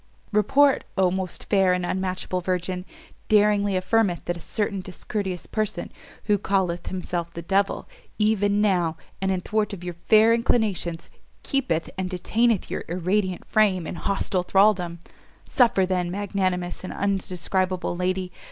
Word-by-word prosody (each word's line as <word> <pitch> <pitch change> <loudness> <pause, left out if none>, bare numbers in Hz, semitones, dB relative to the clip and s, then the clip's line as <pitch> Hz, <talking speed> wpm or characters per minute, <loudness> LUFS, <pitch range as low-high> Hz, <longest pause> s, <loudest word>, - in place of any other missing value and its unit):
"Report, 270 +7 +4
O 185 -2 +3
most 190 -1 -4
fair 190 -3 +4
and 180 0 -1
unmatchable 185 0 -2
virgin! 180 0 -2 0.4
daringly 205 -2 +3
affirmeth 185 -1 +1
that 175 - -1
a - - -8
certain 200 +2 -2
discourteous 185 0 -4
person, 215 -1 -2 0.3
who 205 -2 +2
calleth 185 -3 0
himself 175 -2 -3
the 170 - -6
devil, 195 +3 0 0.3
even 210 -1 +2
now, 175 -6 +1 0.2
and 190 0 +1
in 185 -1 -1
thwart 210 +1 -1
of 180 -3 -7
your 175 -1 -4
fair 220 +1 +6
inclinations, 215 -8 0 0.3
keepeth 255 - 0
and 185 -1 -1
detaineth 220 +4 +1
your - - -4
irradiant 185 +2 -1
frame 195 -5 +2
in - - -4
hostile 190 0 -1
thraldom. 185 -2 +3 0.5
Suffer 230 -7 +3
then, 180 -1 -1
magnanimous 185 -2 -2
and 185 - -5
undescribable 185 -2 -1
lady! 185 0 -1
190 Hz, 140 wpm, -24 LUFS, 180-210 Hz, 0.5 s, fair